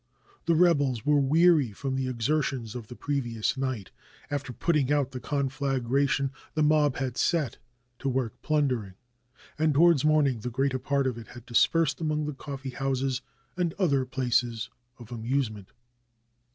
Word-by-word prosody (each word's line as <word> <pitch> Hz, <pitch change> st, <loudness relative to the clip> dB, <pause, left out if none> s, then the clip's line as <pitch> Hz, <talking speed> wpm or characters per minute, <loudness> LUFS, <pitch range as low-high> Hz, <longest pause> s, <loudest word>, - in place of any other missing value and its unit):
The 170 Hz, -, +4 dB
reb 170 Hz, -3 st, +5 dB
els 125 Hz, -6 st, -1 dB
were 150 Hz, -1 st, +4 dB
weary 150 Hz, -3 st, +4 dB
from 135 Hz, +5 st, -3 dB
the 130 Hz, -1 st, -1 dB
exertions 130 Hz, -1 st, -1 dB
of 120 Hz, -3 st, -7 dB
the 125 Hz, -, -9 dB
previous 120 Hz, -7 st, -1 dB
night. 130 Hz, -7 st, -3 dB, 0.4 s
After 145 Hz, -2 st, -3 dB
putting 145 Hz, 0 st, +1 dB
out 145 Hz, -2 st, +1 dB
the 130 Hz, -, -5 dB
conflagration 135 Hz, 0 st, 0 dB, 0.2 s
the 155 Hz, -, +2 dB
mob 150 Hz, -2 st, +3 dB
had 130 Hz, -2 st, -3 dB
set 160 Hz, -8 st, 0 dB, 0.4 s
to 135 Hz, -, -1 dB
work 130 Hz, -3 st, -1 dB
plundering, 130 Hz, -11 st, 0 dB, 0.6 s
and 155 Hz, -2 st, +2 dB
towards 165 Hz, -2 st, +5 dB
morning 150 Hz, -5 st, +3 dB
the 125 Hz, -, -4 dB
greater 130 Hz, +2 st, 0 dB
part 140 Hz, +1 st, 0 dB
of 125 Hz, -3 st, -1 dB
it 115 Hz, -, -11 dB
had 120 Hz, -1 st, -12 dB
dispersed 145 Hz, +4 st, +2 dB
amongst 155 Hz, -1 st, 0 dB
the 150 Hz, -, -3 dB
coffee 135 Hz, -1 st, -7 dB
houses 135 Hz, -1 st, -1 dB, 0.3 s
and 175 Hz, -3 st, -1 dB
other 145 Hz, -9 st, +2 dB
places 125 Hz, -2 st, 0 dB, 0.3 s
of 120 Hz, -1 st, -13 dB
amusement. 115 Hz, -4 st, -2 dB
135 Hz, 155 wpm, -27 LUFS, 125-150 Hz, 0.6 s, reb